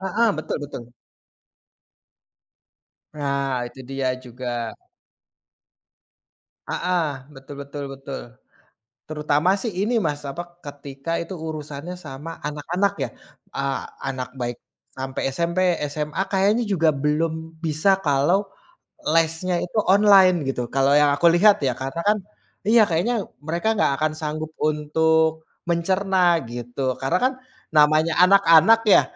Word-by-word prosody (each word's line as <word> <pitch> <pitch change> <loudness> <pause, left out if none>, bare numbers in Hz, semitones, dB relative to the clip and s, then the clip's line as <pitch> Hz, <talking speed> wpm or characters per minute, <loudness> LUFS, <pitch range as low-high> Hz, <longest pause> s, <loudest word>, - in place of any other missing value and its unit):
Heeh, 210 +5 +1
betul 155 - -3
betul. 120 -4 -9 2.2
Nah, 140 -3 -1
itu 130 +2 -14
dia 135 -1 -1
juga. 120 -2 -5 1.9
Heeh, 180 -2 0 0.3
betul 135 +2 -11
betul 140 +1 -7
betul. 135 0 -7 0.9
Terutama 150 +2 0
sih 235 - -2
ini, 225 +4 0
Mas, 145 -4 -2
apa, 175 +5 -7
ketika 140 +2 -7
itu 170 +3 -7
urusannya 155 +1 -6
sama 150 +4 -8
anak-anak 170 +7 -1
ya, - - -3 0.4
eee, 140 0 -1 0.3
anak 130 -1 -4
baik 120 -2 -4 0.4
sampai 130 0 -4
SMP, 170 +5 -1 0.3
SMA 150 +3 -2
kayaknya 200 +5 +2
juga 175 -6 +2
belum 150 +3 0 0.3
bisa 165 +5 +2
kalau 170 +7 +2 0.6
lesnya 165 +2 +1
itu 180 - -6 0.2
online 195 -3 +6
gitu. 125 - -2
Kalau 135 +1 +3
yang 150 0 +5
aku 170 +4 +3
lihat 205 +3 +6
ya 125 - +1
karena 135 +5 -4
kan, 210 +1 +4 0.5
iya 230 +1 +6
kayaknya 180 +9 +1 0.3
mereka 170 +6 -2
gak - - +3
akan 155 0 +1
sanggup 155 0 -3
untuk 160 +1 +1 0.2
mencerna 180 0 +2
gitu. 120 +2 -6 0.2
Karena 150 +7 +1
kan 260 - +2 0.4
namanya 155 +2 +4
anak-anak 195 +2 +6
ya - - +8
155 Hz, 120 wpm, -23 LUFS, 140-180 Hz, 2.2 s, ya